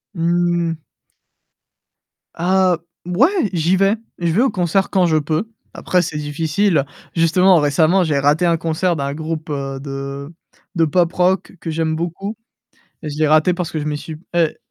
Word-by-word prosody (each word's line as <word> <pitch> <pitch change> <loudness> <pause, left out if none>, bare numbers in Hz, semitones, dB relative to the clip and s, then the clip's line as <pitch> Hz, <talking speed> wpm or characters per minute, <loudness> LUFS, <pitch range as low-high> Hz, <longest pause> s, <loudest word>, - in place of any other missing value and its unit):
Mmh. 170 -1 0 1.6
Ah, 185 +1 +2 0.3
b 180 0 -4
ouais 310 - +3
j'y 170 +2 +2
vais. 195 +3 +3 0.2
Je 170 -1 0
vais 195 +8 +2
au 265 - +3
concert 185 +1 0
quand 185 -2 +2
je 160 -2 +2
peux. 155 +8 -1 0.2
Après, 180 -1 +1
c'est 155 -3 -4
difficile, 155 +2 0 0.3
justement 180 +3 +4
récemment 155 +5 +3
j'ai 150 -4 0
raté 145 +5 +2
un 170 -1 +3
concert 165 +2 0
d'un 140 -2 -3
groupe, 160 +1 -5
heu, 135 -2 -4
de 140 +1 -6 0.4
de 165 -1 +3
pop 170 +2 +2
rock 180 +1 +1
que 165 - -6
j'aime 160 0 -1
beaucoup 175 +6 -4 0.6
et 155 - -5
je 145 - -6
l'ai 155 - +2
raté 155 +4 +4
parce 175 -1 -4
que 160 - -3
je 150 - -4
m'y 150 -1 -2
suis 155 +1 -8 0.2
et 165 -2 +1
165 Hz, 170 wpm, -19 LUFS, 155-180 Hz, 1.6 s, justement